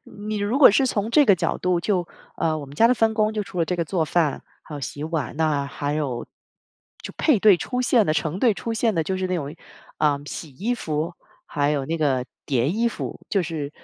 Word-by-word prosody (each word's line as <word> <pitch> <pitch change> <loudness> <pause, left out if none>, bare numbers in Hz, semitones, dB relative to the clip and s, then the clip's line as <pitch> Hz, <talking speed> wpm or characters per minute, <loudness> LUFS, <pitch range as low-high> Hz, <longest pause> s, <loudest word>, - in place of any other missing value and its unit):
你 210 +1 -6
如 205 +6 0
果 285 - +9
是 265 +6 +3
从 215 -3 -1
这 290 +3 +5
个 200 - +7
角 - - -1
度 180 -1 +1
就 180 -1 0 0.3
呃， 160 -1 0
我 145 - -6
们 140 0 -12
家 230 +10 +5
的 250 - +4
分 225 -2 +2
工 215 0 +1
就 215 -1 -2
除 195 -2 -8
了 170 - +3
这 180 +2 -2
个 170 - 0
做 170 +1 -1
饭， 155 -1 0 0.2
还 155 - -10
有 145 - -6
洗 145 +2 -5
碗， 155 -6 -3
那 150 -3 +1
还 145 +1 -3
有 140 -6 -2 0.8
就 - - -7
配 300 -8 +3
对 200 -2 +6
出 250 +6 -2
现 240 -4 +3
的、 155 - +1
成 155 +3 -1
对 230 -1 +3
出 230 - -4
现 225 -1 +1
的 165 -2 0
就 190 +3 -2
是 185 - -1
那 185 - -1
种， 145 -2 -5 0.4
呃， 145 -2 +2
洗 150 +1 -7
衣 205 - -2
服， 160 -5 -3 0.3
还 145 0 0
有 140 -3 0
那 165 +4 -3
个 135 -5 +1 0.2
叠 130 0 +1
衣 230 +6 +1
服。 - - -6
就 195 - +1
是 160 -4 -4
170 Hz, 255 characters per minute, -23 LUFS, 150-215 Hz, 0.8 s, 果